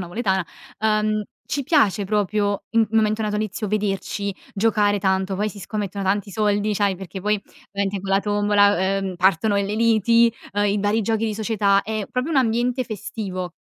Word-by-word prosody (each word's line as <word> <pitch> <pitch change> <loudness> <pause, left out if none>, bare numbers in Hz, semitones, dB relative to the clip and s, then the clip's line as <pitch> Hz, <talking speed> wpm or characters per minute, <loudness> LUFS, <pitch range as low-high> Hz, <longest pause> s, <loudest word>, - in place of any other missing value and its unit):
napoletana, 190 0 -1 0.3
uhm, 215 0 +1 0.2
ci 285 - -2
piace 250 - +2
proprio 205 0 0
in 230 -1 +3
momento 220 -1 +2
natalizio 215 0 -2
vederci, 200 -1 -2 0.2
giocare 205 -1 +2
tanto, 190 0 0
poi 210 +2 0
si 205 - -10
scommettono 200 0 -4
tanti 200 +1 0
soldi, 210 +1 0
c'hai, 200 -1 +1
perché 190 +1 -8
poi 210 +1 0 0.3
ovviamente 200 0 -2
con 195 +1 -6
la 195 0 +3
tombola, 205 -1 +3 0.2
ehm, 190 -2 -4
partono 190 +3 +2
delle 200 +1 -1
liti, 230 +1 +4 0.2
uhm, 205 +1 +1
i 205 0 +1
vari 205 +2 +1
giochi 225 +1 0
di 215 - -2
società; 205 -2 +2
è 215 -2 -3
proprio 250 +5 -2
un 310 - 0
ambiente 245 +1 +1
festivo. 190 -4 -5
205 Hz, 165 wpm, -22 LUFS, 195-220 Hz, 0.3 s, liti